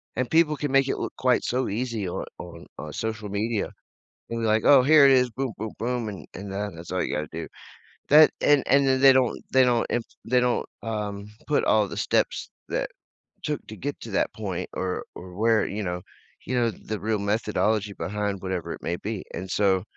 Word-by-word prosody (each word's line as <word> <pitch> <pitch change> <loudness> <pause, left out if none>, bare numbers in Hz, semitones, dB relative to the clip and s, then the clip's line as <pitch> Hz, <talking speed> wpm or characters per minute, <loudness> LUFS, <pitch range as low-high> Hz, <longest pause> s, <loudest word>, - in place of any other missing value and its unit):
and 130 -1 -1
people 160 -2 +4
can 145 -1 -2
make 135 0 +4
it - - -1
look - - -4
quite 130 -1 +2
so 125 +1 0
easy 110 -1 -2
on - - -4
on 85 -1 -9
on 75 - -7
social 110 -1 -4
media, 105 +2 -1 0.6
and 115 0 -2
be 115 - 0
like, 110 0 +2
"Oh, 140 -3 +7
here 150 +2 +7
it 135 - +6
is. 125 -1 +4
Boom, 130 +1 -3
boom, 110 0 -4
boom, 120 -1 -2
and 95 -6 -8
and 100 +1 -7
that 100 +1 -3
that's 85 +1 -9
all 95 - 0
you - - -2
gotta 75 0 -2
do." - - -5 0.6
That 155 +2 +8
and 145 -2 +4
and 140 0 +5
then 130 -1 +3
they 135 0 +8
don't 130 -2 +2
they 130 0 +6
don't 120 -2 +2
imp 120 - 0 0.2
they 125 +2 +3
don't, 125 -1 +1 0.2
um, 105 -2 -4 0.2
put 150 - +2
all 105 -1 +3
the - - -7
steps - - 0 0.2
that - - -2 0.5
took - - -3
to - - -8
get - - -4
to - - -8
that - - +1
point - - -4
or 90 -1 -2
or 90 0 -10
where, 110 +2 +3
you 105 +2 -4
know 90 -1 -3 0.4
you 125 - -2
know, 120 -2 +2
the 110 +2 -6
real 110 0 -1
methodology 105 0 0
behind 100 -1 -3
whatever 95 -3 -3
it - - -7
may 85 - -2
be, 105 0 -4
and 95 - -5
so, 95 -3 +2
110 Hz, 215 wpm, -25 LUFS, 100-125 Hz, 0.6 s, That